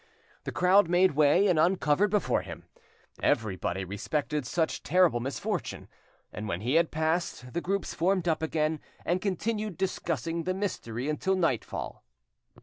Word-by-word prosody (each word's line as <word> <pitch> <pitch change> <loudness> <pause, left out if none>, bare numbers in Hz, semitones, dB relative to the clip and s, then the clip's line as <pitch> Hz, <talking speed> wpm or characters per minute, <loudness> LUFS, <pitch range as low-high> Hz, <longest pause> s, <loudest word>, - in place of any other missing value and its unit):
The - - -3
crowd 185 +1 +4
made 180 +2 +4
way 150 +6 +4
and 180 -6 +3
uncovered 175 +2 +3
before 210 -1 +1
him, - - -9 0.6
everybody 95 -3 0
respected 145 - -2
such 160 +4 -1
terrible 175 -6 +3
misfortune, 125 0 -4 0.5
and 105 0 -5
when 90 -2 -3
he 120 +5 -1
had 165 0 +4
passed, 160 -5 -2
the 170 - -1
groups 195 +3 -2
formed 180 +1 +1
up 160 -2 +1
again, 155 -1 0 0.3
and 180 +2 0
continued 210 0 -2
discussing 170 -3 -2
the 185 0 0
mystery 135 - -3
until 190 +5 0
nightfall. 165 - -2
165 Hz, 145 wpm, -28 LUFS, 145-185 Hz, 0.6 s, crowd